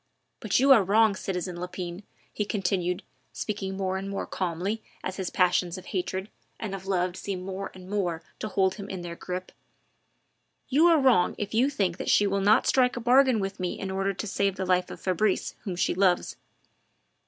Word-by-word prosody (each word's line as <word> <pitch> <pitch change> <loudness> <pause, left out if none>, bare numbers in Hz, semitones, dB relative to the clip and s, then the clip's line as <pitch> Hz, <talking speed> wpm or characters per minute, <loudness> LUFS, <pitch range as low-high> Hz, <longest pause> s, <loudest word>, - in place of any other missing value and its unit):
But - - +1
you 270 +2 +5
are 230 -7 +8
wrong, 210 +2 +4
citizen 180 -2 -4
Lepine," 180 0 -5 0.3
he 210 - -1
continued, 180 -3 -1 0.3
speaking 195 -3 -4
more 190 -1 -1
and 195 +1 -5
more 200 - -3
calmly 185 +5 -2 0.2
as 185 - -4
his 190 -3 -2
passions 180 -1 +2
of 185 - -10
hatred 190 +1 -3 0.3
and 215 -3 -4
of 190 -1 -7
love 180 -2 0
seemed 190 -1 -4
more 195 +1 -4
and 185 -1 -11
more 180 -5 -1 0.2
to - - -3
hold 190 -3 +2
him 200 0 -8
in 185 -2 -5
their 170 -1 -6
grip; 185 +1 -5 1.2
"you 305 +6 +5
are 335 -2 +6
wrong 255 -10 +4
if 205 - -4
you 245 +5 +3
think 195 -11 -1
that - - -3
she 205 - +5
will 200 0 0
not 210 +5 +4
strike 250 -2 +3
a - - -1
bargain 250 0 +4
with 195 0 -4
me 180 -1 -3
in 190 - -4
order 195 +1 0
to 215 - -4
save 200 -1 0
the 190 - -3
life 180 0 +2
of - - -8
Fabrice, 190 +2 0
whom 190 -4 -3
she 175 - +1
loves. 185 -1 +2
195 Hz, 200 wpm, -27 LUFS, 180-210 Hz, 1.2 s, are